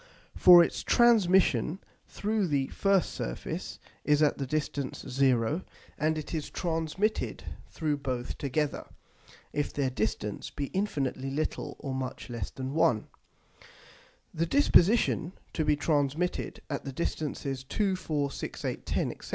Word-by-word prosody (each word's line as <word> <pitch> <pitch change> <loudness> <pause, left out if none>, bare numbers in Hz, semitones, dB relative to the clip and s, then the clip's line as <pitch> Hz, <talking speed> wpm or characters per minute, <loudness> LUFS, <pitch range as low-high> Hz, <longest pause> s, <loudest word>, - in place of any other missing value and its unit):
(for 175 -1 +9
its - - -2
transmission 190 - +4 0.3
through 210 -1 -1
the 140 -4 +1
first 195 -2 +2
Surface, - - -5 0.3
is 150 +1 +3
at 150 - +2
the 135 - -2
distance 140 -1 -3
0, 130 +3 +2 0.3
and 155 +1 0
it 155 - -6
is 155 -3 -3
transmitted 170 +5 -1 0.3
through 155 -3 -1
both 130 -3 -3
together, 145 +1 -1 0.7
if 145 - -1
their 135 -2 -1
distance 105 -2 -2
be 140 -1 -5
infinitely 140 -9 -1
little 145 +3 -3
or 135 -2 -5
much 130 -1 -5
less 115 -5 -4
than 130 +1 -5
1) 125 -8 +2 1.2
the 165 +1 0
disposition 200 - +4 0.2
to 160 - 0
be 150 0 +3
transmitted 150 +3 -1
at 140 - -4
the 135 - -5
distances 140 -2 -3
2, 195 +8 0
4, 150 -6 -2
6, - - -6
8, - - -3
10, - - 0
&c. - - -10
150 Hz, 135 wpm, -29 LUFS, 135-175 Hz, 1.2 s, for